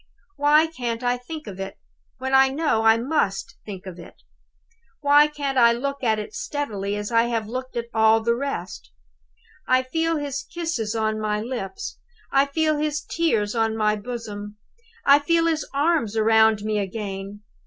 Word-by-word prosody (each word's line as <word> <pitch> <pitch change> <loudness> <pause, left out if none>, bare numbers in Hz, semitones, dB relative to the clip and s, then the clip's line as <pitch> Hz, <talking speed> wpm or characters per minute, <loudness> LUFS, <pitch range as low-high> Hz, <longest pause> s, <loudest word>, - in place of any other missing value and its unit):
"Why 295 +2 +4
can't 245 -7 -4
I 245 0 +2
think 300 +5 -8
of 195 -2 -8
it, 195 0 -6 0.4
when 265 +1 -3
I 265 0 +6
know 280 -5 +1
I 225 0 +5
must 230 -6 -1
think 195 -3 -7
of 180 -2 -8
it? 170 - -12 0.9
Why 290 +1 +6
can't 280 -3 -2
I 235 -1 +6
look 275 +3 -4
at 220 -3 +2
it 210 - -5
as 470 - -7
steadily 225 - -3
as 205 +2 -4
I 230 0 +4
have 230 -2 -1
looked 255 +3 -6
at 235 - -2
all 220 0 +5
the 235 +1 +1
rest? 260 -7 -5 0.8
I 255 0 +3
feel 325 +5 0
his 285 -1 -3
kisses 320 -11 -2
on 220 -1 0
my 210 -1 0
lips; 215 -5 -5 0.3
I 275 +1 +4
feel 310 +1 +1
his 300 0 -1
tears 225 -12 0
on 225 -1 0
my 210 -1 +2
bosom; 210 -2 -7 0.5
I 280 +1 +7
feel 330 +3 +2
his 320 -2 0
arms 285 -7 +1
round 220 -1 +4
me 215 0 0
again. 200 0 -5
235 Hz, 175 wpm, -23 LUFS, 215-285 Hz, 0.9 s, I